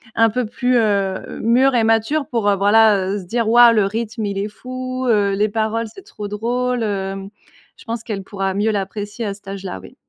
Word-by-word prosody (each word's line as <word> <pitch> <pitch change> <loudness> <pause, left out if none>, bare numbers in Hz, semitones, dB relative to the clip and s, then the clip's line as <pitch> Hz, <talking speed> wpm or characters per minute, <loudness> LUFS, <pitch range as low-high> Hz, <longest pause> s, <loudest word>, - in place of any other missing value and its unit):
un 225 0 +4
peu 250 +3 -1
plus, 245 +3 0
heu, 200 -4 0
mûre 255 +4 +3
et 235 - +3
mature 225 +7 +1
pour 230 -3 -1
voilà 205 -1 +4
se 185 - -10
dire: 230 +4 -1
«Waouh, 240 0 +7
le 210 -3 +3
rythme 220 +2 -3
il 200 -1 -3
est 200 +1 -1
fou, 255 +3 -5
heu, 205 -4 +2
les 210 +2 +1
paroles 225 +2 -1
c'est 390 - -12
trop 215 - -8
drôle, 240 +3 -1
heu». 195 -2 -2 0.6
Je - - -16
pense 230 -1 -4
qu'elle 210 -4 -4
pourra 195 -1 -3
mieux 205 +3 +1
l'apprécier 205 +3 -4
à 200 - -2
cet 200 0 -17
âge-là 195 - -6
oui. 95 - -14
220 Hz, 200 wpm, -19 LUFS, 200-235 Hz, 0.6 s, Waouh